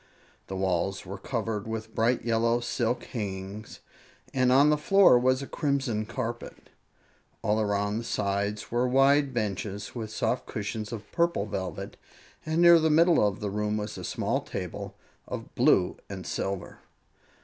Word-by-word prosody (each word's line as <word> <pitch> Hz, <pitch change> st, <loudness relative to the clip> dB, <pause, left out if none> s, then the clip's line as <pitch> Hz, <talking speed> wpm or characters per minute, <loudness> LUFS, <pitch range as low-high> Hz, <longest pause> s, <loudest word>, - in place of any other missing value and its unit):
The 95 Hz, -, -5 dB
walls 95 Hz, 0 st, -1 dB
were 95 Hz, +2 st, -7 dB
covered 110 Hz, -1 st, -3 dB
with 110 Hz, 0 st, -5 dB
bright 120 Hz, +2 st, +1 dB
yellow 115 Hz, +1 st, +2 dB
silk 120 Hz, 0 st, -1 dB
hangings 100 Hz, -1 st, -6 dB, 0.5 s
and 130 Hz, -1 st, +3 dB
on 140 Hz, +3 st, +6 dB
the -, -, +4 dB
floor 195 Hz, -5 st, +6 dB
was 130 Hz, +2 st, +2 dB
a -, -, -7 dB
crimson 135 Hz, -8 st, -1 dB
carpet. 120 Hz, 0 st, -6 dB, 0.7 s
All 105 Hz, +2 st, +2 dB
around 105 Hz, +1 st, 0 dB
the -, -, -5 dB
sides 100 Hz, -1 st, -2 dB
were 120 Hz, +2 st, +2 dB
wide 135 Hz, +2 st, +4 dB
benches 105 Hz, -3 st, -3 dB
with 110 Hz, -3 st, -5 dB
soft 115 Hz, +3 st, -1 dB
cushions 105 Hz, +1 st, -4 dB
of 110 Hz, -3 st, -7 dB
purple 170 Hz, -12 st, +1 dB
velvet, 95 Hz, -3 st, -5 dB, 0.5 s
and 160 Hz, +2 st, +2 dB
near 170 Hz, -1 st, +8 dB
the 160 Hz, 0 st, +2 dB
middle 165 Hz, 0 st, +5 dB
of 100 Hz, 0 st, -4 dB
the 105 Hz, -1 st, -2 dB
room 105 Hz, +1 st, -1 dB
was 105 Hz, 0 st, -4 dB
a -, -, -7 dB
small -, -, -1 dB
table -, -, -6 dB, 0.3 s
of -, -, -7 dB
blue 90 Hz, -1 st, +3 dB
and 95 Hz, -3 st, -7 dB
silver. 95 Hz, +1 st, -4 dB
110 Hz, 155 wpm, -28 LUFS, 100-130 Hz, 0.7 s, near